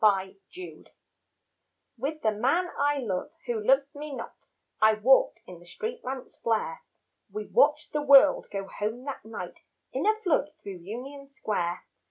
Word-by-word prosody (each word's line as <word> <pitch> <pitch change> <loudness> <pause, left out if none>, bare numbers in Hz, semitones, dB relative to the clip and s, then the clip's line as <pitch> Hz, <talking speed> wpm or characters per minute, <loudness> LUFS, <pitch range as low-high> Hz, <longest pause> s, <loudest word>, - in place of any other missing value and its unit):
Union 195 -3 +3 0.5
Square - - -25 1.0
With 285 +6 -4
the 220 - +4
man 330 - +1
I 290 +1 +2
love 215 -4 -2 0.2
who 235 -4 -2
loves 270 +4 +3
me 295 -1 -6
not, 235 - -9 0.3
I 215 0 +6
walked 255 +5 +4
in 180 -2 -11
the 175 - -17
street 455 - -5
lamps' 260 0 -6
flare; 220 -8 -1 0.5
We 210 +1 -4
watched 295 +6 +3
the 300 - +1
world 280 0 +7
go 195 -1 -3
home 215 +5 -4
that 275 -5 -6
night 220 +1 -8 0.3
In - - 0
a 435 - +5
flood 300 -4 +1
through 195 -2 -6
Union 255 +10 -8
Square. 185 -10 -2
250 Hz, 160 wpm, -28 LUFS, 210-285 Hz, 1.0 s, world